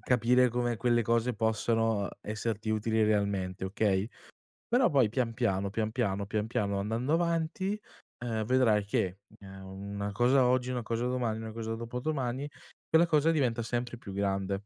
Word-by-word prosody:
capire 125 +1 +3
come 120 0 0
quelle 120 +1 +2
cose 115 +2 +1
possono 110 -1 +1 0.2
esserti 110 0 -3
utili 110 +1 +1
realmente, 100 -3 0
okay; 100 0 +1 0.6
però 245 +1 +4
poi 130 -6 +4
pian 115 0 -1
piano, 100 -5 0
pian 110 +1 -1
piano, 100 -5 -1
pian 105 0 -1
piano 100 -3 -1
andando 115 +7 -2
avanti, 170 +4 0 0.5
ehm, 110 -2 -1
vedrai 115 -4 +3
che, 95 -2 -1 0.2
u - - -12
ehm, 95 0 -10 0.3
una 100 0 -3
cosa 125 +4 +4
oggi 125 0 +1
una 125 -2 -2
cosa 115 +2 -2
domani 120 -3 -1
una 110 0 -6
cosa 115 0 -4
dopodomani, 125 +3 -3 0.4
quella 165 +2 +5
cosa 155 0 +3
diventa 125 -7 +1
sempre 120 +1 -3
più 100 -4 -9
grande. 100 0 -1
115 Hz, 160 wpm, -30 LUFS, 105-125 Hz, 0.6 s, quella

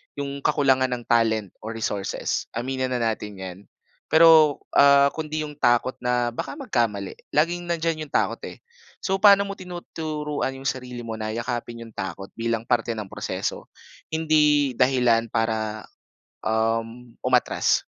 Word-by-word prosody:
yung 140 0 -4
kakulangan 135 -2 +3
ng 120 - -9
talent 110 -4 +1
o - - -9
resources, 105 -3 -2
aminin 130 +2 -2
na 125 -2 -1
natin 105 -2 -2
'yan. 95 -1 -8 0.5
Pero 160 -2 +6 0.2
ah 140 0 +7
kundi 155 -1 -4
yung 150 -1 -8
takot 120 -1 +2
na 125 -1 0
baka 120 - -5
magkamali 115 - -2 0.2
laging 175 +3 +1
nandiyan 165 -2 -1
yung 145 - -21
takot - - +1
eh. - - -10 0.4
So, 190 0 +1
paano 200 -1 +7
mo 200 - -4
tinuturuan 155 -6 -4
yung 135 - -11
sarili 125 -2 -3
mo 115 - -4
na 110 0 -3
yakapin 115 0 -4
yung 115 - -14
takot 95 0 -6
bilang 115 -1 -1
parte 120 -1 +1
ng 110 -3 -6
proseso - - -4 0.5
hindi 150 -3 +3
dahilan 125 -3 +3
para 110 -1 -1 0.6
uhm 115 +2 -1
umatras. 125 -1 +2
125 Hz, 145 wpm, -24 LUFS, 115-150 Hz, 0.6 s, ah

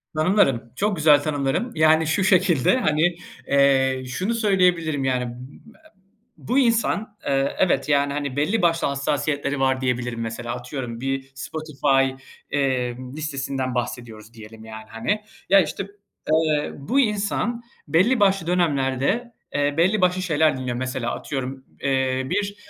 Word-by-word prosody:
Tanımlarım. 155 - +2
Çok 205 +4 0
güzel 150 -3 +5
tanımlarım. 145 - -1
Yani, 160 0 +4
şu 175 +5 +1
şekilde, 185 - +3
hani, 165 -5 +2 0.3
eee, 135 -2 +3
şunu 185 - -2
söyleyebilirim, 180 - +2
yani, 125 -1 0
bu 140 - -14
e 315 0 -23 0.5
bu 260 +3 0
insan, 225 -3 +1
eee, 135 0 0
evet, 180 -4 +2
yani, 140 -1 +2
hani, 140 -2 -3
belli 155 +11 +1
başlı 170 -1 +2
hassasiyetleri 140 0 -1
var 130 0 +1
diyebilirim. 125 -2 -2
Mesela, 115 +1 -4
atıyorum 125 -2 -6
bir 135 0 -3
Spotify, 135 -2 -1 0.3
eee, 130 -4 0 0.2
listesinden 135 -4 -3
bahsediyoruz 115 -3 -5
diyelim, 110 0 -12
yani, 110 0 -9
hani. 120 - -2 0.3
Ya, 195 +1 +7
işte, 180 +4 -4 0.4
eee, 155 -2 +2
bu 235 - 0
insan 215 +1 0 0.2
belli 185 - +3
başlı 195 -4 +2
dönemlerde, 170 - 0 0.2
eee, 145 0 +1
belli 190 +5 +3
başlı 180 0 +2
şeyler 160 -5 +2
dinliyor, 125 -2 -3
mesela, 130 -1 -3
atıyorum. 130 -1 -5 0.2
Eee, 130 -1 0
bir, 200 +1 -1
145 Hz, 135 wpm, -23 LUFS, 130-180 Hz, 0.5 s, Ya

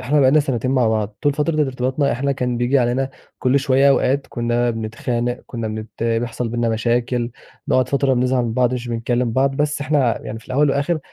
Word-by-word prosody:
إحنا 145 +4 +2
بقى 130 - +5
لنا 155 +2 +5
سنتين 130 -3 -1
مع 125 -4 +3
بعض، 110 -1 -1
طول 145 -2 +3
فترة 155 +1 0
ارتباطنا 130 +1 0
إحنا 140 +3 0
كان 125 -2 -2
بييجي 125 +3 +2
علينا 130 +2 0 0.3
كل 130 +2 +2
شوية 140 0 +3
أوقات 140 0 +2
كنا 120 0 0
بنتخانق، 120 +2 -3
كنا 115 -3 -4
بنت 110 +1 -7
بيحصل 115 +1 -1
بينّا 120 0 -1
مشاكل، 120 +2 0 0.4
نقعد 130 -1 +2
فترة 140 -1 +2
بنزعل 125 0 +1
من 115 - -2
بعض، 125 +1 +2
مش 120 -1 -5
بنكلّم 120 +1 -1
بعض، 135 +2 +1
بس 150 0 0
إحنا 140 -5 +1
يعني 110 - -5
في - - -18
الأول 140 +2 +2
وآخر 145 +4 0
125 Hz, 200 wpm, -20 LUFS, 120-140 Hz, 0.4 s, بقى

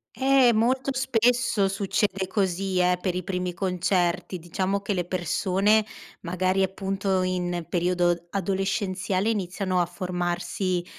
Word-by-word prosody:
Eh, 265 -3 +4
molto 255 +5 +1
spesso 245 -5 +2
succede 195 0 -1
così, 190 -1 -1
eh, 180 0 +3
per 180 -2 -1
i 185 - -2
primi 180 -1 -2
concerti. 180 0 0
Diciamo 185 +4 -2
che 200 +1 -2
le 180 -2 -1
persone 190 +4 +2 0.4
magari 185 +2 0
appunto 190 0 0
in 175 -2 -2
periodo 175 -1 +1
adolescenziale 195 +1 -1
iniziano 185 -2 -1
a 170 - 0
formarsi 180 0 -2
185 Hz, 120 wpm, -25 LUFS, 180-200 Hz, 0.4 s, Eh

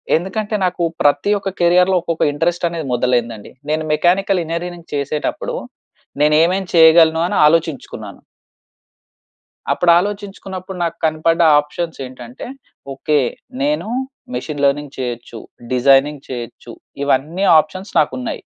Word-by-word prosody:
ఎందుకంటే, 205 +5 -2
నాకు 180 -1 -1 0.2
ప్రతి 145 +7 +2
ఒక్క 195 - -3
కేరియర్లో 180 +2 +4
ఒక్కొక్క 165 -1 -2
ఇంట్రెస్ట్ 170 +3 0
అనేది 165 -3 -5
మొదలైందండి. 120 -3 -1 0.2
నేను 155 +1 0
మెకానికల్ 185 +3 +2
ఇంజినీరింగ్ 170 +1 -6
చేసేటప్పుడు 145 +1 -3 0.7
నేనేమేమి 165 +5 +3
చేయగలను 160 0 +6
అని - - -3
ఆలోచించుకున్నాను. 150 - -1 1.5
అప్పుడు 175 -1 +3
ఆలోచించుకున్నప్పుడు 195 -2 -6
నాకు 170 0 -3
కనపడ్డ 160 +2 +1 0.2
ఆప్షన్స్ 160 +2 -5
ఏంటంటే, 125 - -10 0.5
ఓకే 150 +2 +1 0.4
నేను 295 -6 0 0.5
మెషిన్ 145 -2 -4
లెర్నింగ్ 145 0 -1
చేయొచ్చు, 120 -2 -5 0.3
డిజైనింగ్ 135 +3 +3
చేయొచ్చు 120 -3 -7 0.3
ఇవన్నీ 150 +7 0 0.2
ఆప్షన్స్ 185 +6 -5
నాకున్నాయి. 130 -4 -2
160 Hz, 105 wpm, -18 LUFS, 140-180 Hz, 1.5 s, చేయగలను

